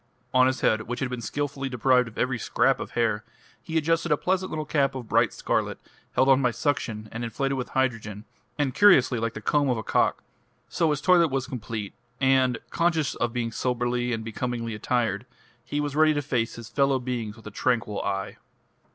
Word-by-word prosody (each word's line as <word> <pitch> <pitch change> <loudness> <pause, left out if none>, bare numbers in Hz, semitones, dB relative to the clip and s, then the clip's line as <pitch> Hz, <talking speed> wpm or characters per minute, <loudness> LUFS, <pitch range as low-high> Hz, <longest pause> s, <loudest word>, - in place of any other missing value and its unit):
On 130 0 +6
his 130 -1 -1
head, 110 - +3
which 120 +1 -3
had 130 -2 -2
been 125 -1 -4
skilfully 140 +4 -3
deprived 125 0 +3
of 115 - -12
every 125 -1 0
scrap - - +2
of - - -7
hair, 110 -2 +1 0.4
he 160 +7 -3
adjusted 165 +1 +1
a 150 - +4
pleasant 185 +2 0
little 155 -1 -3
cap 140 -3 +1
of 125 -3 -6
bright - - +3
scarlet, - - -1 0.4
held 130 - +3
on 135 0 +5
by 125 - +3
suction 115 -4 -2
and 120 +1 -5
inflated 135 +4 -1
with 130 -2 -4
hydrogen, 110 -5 -1 0.3
and 140 -3 0
curiously 135 - +5
like 115 0 -2
the 110 - -6
comb 145 +5 +2
of 125 - +1
a 110 - -4
cock. - - +1 0.4
So 165 - +1
his 150 -2 0
toilet 170 +2 +5
was 135 -1 -1
complete; 115 -6 -5 0.3
and, 130 -2 +3
conscious 165 -4 +1
of 120 - -1
being 115 -1 -2
soberly 125 0 -1
and 110 -1 -3
becomingly 115 0 -3
attired, 115 0 -1 0.4
he 145 - -3
was 145 -1 -2
ready 155 0 +4
to 145 - 0
face 120 -4 -1
his 115 -1 -9
fellow 135 0 +2
beings 120 -4 -4
with 110 - -17
a 105 - -7
tranquil 115 -1 0
eye. 95 0 -3
125 Hz, 200 wpm, -26 LUFS, 115-140 Hz, 0.4 s, On